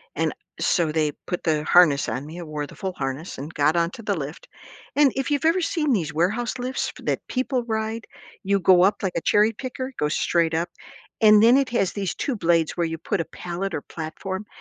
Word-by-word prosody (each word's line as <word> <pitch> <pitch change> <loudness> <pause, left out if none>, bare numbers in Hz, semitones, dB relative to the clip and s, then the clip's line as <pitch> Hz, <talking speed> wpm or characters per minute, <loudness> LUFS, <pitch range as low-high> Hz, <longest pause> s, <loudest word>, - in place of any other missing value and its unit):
And - - 0 0.3
so 170 -4 +1
they 155 -1 +1
put 180 - -4
the 155 -2 +1
harness 155 -7 +5
on 130 +2 -3
me. 170 +3 -8
I - - -6
wore 150 -2 -4
the - - -13
full 190 -3 -4
harness 135 +5 -4
and 150 +5 -6
got 150 +3 +2
onto 170 +7 -1
the 200 -2 -1
lift. 150 +1 -7 0.5
And 290 -3 +5
if 270 +2 -2
you've 285 0 0
ever 335 +3 +3
seen 310 -4 0
these 160 -8 0
warehouse 225 +10 0
lifts 255 +2 -2
that - - -2
people 255 -1 -1
ride, 220 0 -3 0.4
you 200 0 +2
go 180 -1 +5
up 205 +1 +2
like 190 -2 -1
a - - +1
cherry 210 +2 +3
picker, 260 +3 -6
go 150 - +1
straight 165 +1 +1
up, 170 +2 -1 0.5
and 215 -1 +7
then 240 +3 +7
it 275 -2 +2
has 195 -6 +1
these 195 -3 -3
2 265 -5 -2
blades 165 -4 +1
where 170 -1 +1
you 165 0 -3
put 185 +2 -2
a - - 0
pallet 180 +1 -5
or 145 - -3
platform, 190 +5 -6
185 Hz, 220 wpm, -24 LUFS, 160-230 Hz, 0.5 s, and